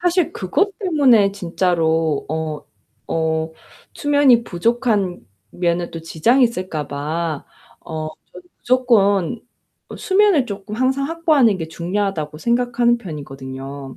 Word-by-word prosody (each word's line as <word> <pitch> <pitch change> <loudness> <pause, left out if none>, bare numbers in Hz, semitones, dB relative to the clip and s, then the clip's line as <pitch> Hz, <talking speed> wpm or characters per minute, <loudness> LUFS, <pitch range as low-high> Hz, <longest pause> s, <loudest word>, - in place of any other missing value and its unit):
사실 355 -1 +1
그것 390 - -1
때문에 265 - +4
진짜로 165 -4 0
어 155 -1 -3 0.5
어 160 0 0 0.4
수면이 285 -5 +4
부족한 205 -1 0 0.2
면은 175 -1 -1
또 165 - -7
지장이 230 - +3
있을까 185 - -3
봐 155 +2 -3 0.3
어 155 -2 -5 0.2
전 - - -11 0.2
'무조건 225 -5 +2 0.6
수면을 385 -7 +3
쪼끔 205 -1 -7
항상 265 +3 0
확보하는 310 - +3
게 160 -2 -5
중요하다.'고 170 -3 -3
생각하는 240 +4 +1
편이거든요, 135 - -8
195 Hz, 255 characters per minute, -20 LUFS, 160-250 Hz, 0.6 s, 때문에